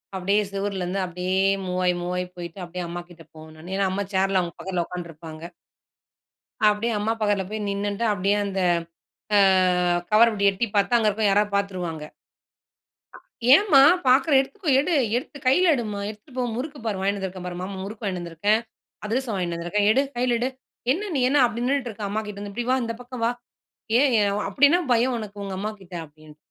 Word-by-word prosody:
அப்படியே 195 +3 +1
செவுருலந்து 195 -1 -2
அப்படியே 180 +1 -2 0.3
மூவ் 180 0 -2
ஆயி, 180 - +3
மூவ் 175 +1 -3
ஆயி 180 0 -2
போயிட்டு, 175 +1 -8
அப்படியே 175 +1 -6
அம்மா 175 +1 -5
கிட்ட 170 -1 -14
போவன் 155 0 -12
நானு. 175 +4 -8
ஏன்னா 195 -1 +2
அம்மா 200 +2 -2
சேர்ல 190 0 +2
அவங்க 170 -2 -5
பக்கத்துல 180 -3 -2
உட்கான்ட்ருப்பாங்க. 165 -2 -8 1.3
அப்டியே 210 +3 0
அம்மா 215 +2 0
பக்கத்தில 205 -2 +1
போய் 215 -1 -3
நின்னுட்டு, 200 +2 -2
அப்டியே 200 +1 +1
அந்த 195 -1 -2 0.8
ஆ, - - +6 0.7
கவர் 225 +2 +6
அப்டி 205 -3 -1
எட்டி 195 +4 -1
பாத்தா, 205 +3 +2
அங்க 225 -2 +3
இருக்கிற 210 +1 -1
யாராவது 205 +1 +2
பார்த்துருவாங்க. 180 -6 -2 1.5
"ஏம்மா, 320 -3 +6 0.3
பாக்கிற 265 +4 +4
எடுத்துக்கோ 355 +7 -4
எடு, 315 +5 0 0.2
எடுத்து 275 +3 -7
கையில 335 +7 +5
எடுமா, 215 -5 -3
எடுத்துட்டு 215 +6 -12
போ. 255 - 0
முறுக்கு 285 +4 -5
பார் 210 -3 -1
வாங்கின்னு 200 +1 0
வந்துருக்கேன் 185 -1 -6
பார், 175 - -5
மாமா 190 +1 -5
முறுக்கு 210 +3 -8
வாங்கின்னு 185 -3 -2
வந்திருக்கேன், 175 +6 +1 0.5
அதிரசம் 235 +2 -1
வாங்கின்னு 175 -3 -2
வந்திருக்கேன், 200 +5 0
எடு 265 - +3 0.2
கையில 245 -1 +1
எடு. 250 +2 0 0.4
என்ன 405 +6 -4
நீ 270 - +1
என்ன 285 +1 +4
அப்டி 235 0 -3
நின்னுட்டு 270 -1 0
இருக்க 215 0 -9
அம்மா 215 +2 -1
கிட்டேருந்து 205 0 -7
இப்படி 240 +3 -3
வா, 260 - +3
இந்த 230 0 -3
பக்கம் 245 -1 -6
வா. 235 - +2 0.7
ஏன் 280 +1 +4
ஏ - - +3 0.3
அப்படி 260 +9 +5
என்ன 350 +4 +4
பயம் 245 +2 +2
உனக்கு 205 -2 -7
உங்க 195 -1 -5
அம்மாகிட்ட." 200 -3 -6
அப்டின்னு. 155 0 -17
205 Hz, 185 wpm, -24 LUFS, 180-235 Hz, 1.5 s, ஆ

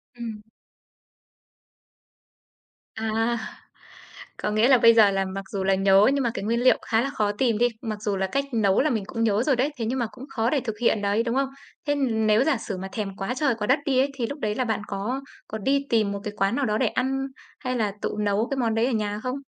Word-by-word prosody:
Ừm. 230 -3 -6 2.5
À. 225 +2 0 1.0
Có - - -2
nghĩa 215 +3 +3
là 265 -1 +6
bây 230 0 +7
giờ 215 -3 +6
là 195 0 0
mặc 195 +1 -5
dù 195 -1 -2
là 195 0 +3
nhớ 195 +1 +5
nhưng 280 -2 0
mà 235 - +1
cái 195 - -4
nguyên 230 +3 0
liệu 255 - +6
khá 225 -1 +2
là 275 - -1
khó 210 -6 0
tìm 225 0 +1
đi, 240 - +4
mặc 215 -3 -5
dù 205 -2 -1
là 190 0 0
cách 275 +8 0
nấu 205 -3 +3
là 305 - +2
mình 220 -6 -1
cũng 230 -1 -2
nhớ 215 +1 +2
rồi 275 -3 +2
đấy, 270 +5 0
thế 230 - -2
nhưng 255 +3 -1
mà 235 - 0
cũng 260 +1 -10
khó 230 0 0
để 290 - +1
thực 220 -4 -5
hiện 225 -3 +2
đấy, 205 +3 +1
đúng 235 +1 -2
không? 270 0 +1 0.4
Thế, 290 - +3
ừm, 230 -6 0
nếu 215 +4 +4
giả 285 -5 +2
sử 205 -3 -5
mà 190 +1 -5
thèm 200 -3 -4
quá 195 +6 -2
trời 275 -4 +1
quá 210 - -3
đất 265 +3 +4
đi 265 -3 +2
ấy 275 +1 +2
thì 240 -4 -2
lúc 285 +4 -6
đấy 210 -4 -1
là 255 - 0
bạn 220 -2 -1
có 210 +7 -3 0.3
có 220 - -5
đi 275 +6 0
tìm 215 -3 +2
một 200 - -4
cái 210 -1 -5
quán 195 +4 +1
nào 285 - 0
đó 215 -2 0
để - - +2
ăn 270 +1 -1 0.3
hay 255 -3 -3
là 215 -4 0
tự - - -1
nấu 210 +3 +1
cái 275 - -1
món 230 -3 0
đấy 225 +2 +2
ở 265 - 0
nhà 210 -2 -1
không? 255 +2 -3
225 Hz, 255 wpm, -25 LUFS, 210-255 Hz, 2.5 s, bây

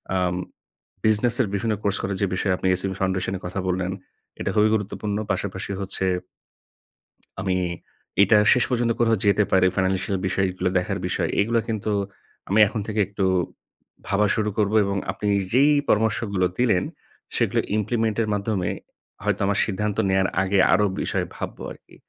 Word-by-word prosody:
আম 90 -1 +1 0.7
business 110 +2 +3
এর 110 - +1
বিভিন্ন 110 +2 0
course 100 0 +1
করে 100 - -1
যে - - +4
বিষয়ে 95 0 +1
আপনি 95 - -2
SME 95 0 -1
এ - - -11
foundation 95 0 0
এর - - -14
কথা 95 +2 -4
বললেন 90 0 -1 0.5
এটা - - -2
খুবই 105 +1 +4
গুরুত্বপূর্ণ। 105 0 -3
পাশাপাশি 100 0 -3
হচ্ছে 95 0 -3 1.4
আমি 95 -1 0 0.7
এটা 105 +2 +5 0.2
শেষ 125 - +2
পর্যন্ত 120 -2 +1
কোথাও 115 -2 +3
যেতে 100 +1 +4
পারি 95 -1 +5
financial 95 0 0
বিষয়গুলো 95 -1 0
দেখার 90 - -1
বিষয় - - -1
এগুলো 115 +2 +2
কিন্তু 110 -1 -2 0.6
আমি 105 +3 +3
এখন 110 0 -3
থেকে 105 0 -2
একটু 100 -1 -2 0.8
ভাবা 105 +1 +2
শুরু 105 -1 0
করবো 105 0 +1
এবং 100 0 -1
আপনি 105 - -4 0.3
যেই 140 +4 +5 0.2
পরামর্শগুলো 105 -3 +1
দিলেন 115 -7 +2 0.5
সেগুলো - - +1 0.2
implement 110 0 0
এর 110 - 0
মাধ্যমে 100 -3 -1 0.5
হয়তো - - 0
আমার 100 0 +1
সিদ্ধান্ত 105 0 -2
নেওয়ার 95 0 +3 0.2
আগে 95 0 +1
আরো 105 +3 +4 0.2
বিষয় - - -1
ভাববো - - -6
আরকি। - - -15
100 Hz, 160 wpm, -24 LUFS, 95-110 Hz, 1.4 s, এটা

